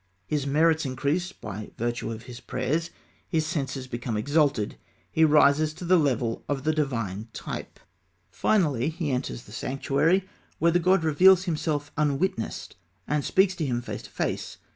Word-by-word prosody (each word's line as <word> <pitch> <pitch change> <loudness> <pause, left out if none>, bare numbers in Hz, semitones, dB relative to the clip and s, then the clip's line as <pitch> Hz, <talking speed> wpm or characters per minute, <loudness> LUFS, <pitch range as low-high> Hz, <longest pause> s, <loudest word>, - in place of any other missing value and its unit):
His 145 -2 -1
merits 160 +3 +3
increase 145 +7 -1
by 105 - -8
virtue 120 0 -2
of 115 +1 -7
his 120 -2 -9
prayers; 165 +7 -2 0.4
his 160 -3 +1
senses 140 -5 -3
become 120 -2 -3
exalted; 140 -3 +1 0.3
he 160 - +3
rises 150 0 +4
to 180 - -7
the 185 +2 +5
level 125 -6 0
of 140 -2 -1
the 155 +1 +2
divine 115 -9 -2
type. - - -6 0.5
Finally 150 - +2
he 160 -3 -3
enters 125 - -3
the - - -15
sanctuary, 150 +8 +1 0.3
where 170 +1 +3
the 175 - +3
god 185 0 +3
reveals 180 +4 +6
himself 150 -4 -2
unwitnessed, 150 +6 -1 0.3
and 150 -1 0
speaks 190 0 +3
to 160 - -1
him 120 -2 -1
face - - -5
to - - -12
face. - - -3
150 Hz, 160 wpm, -26 LUFS, 130-165 Hz, 0.5 s, reveals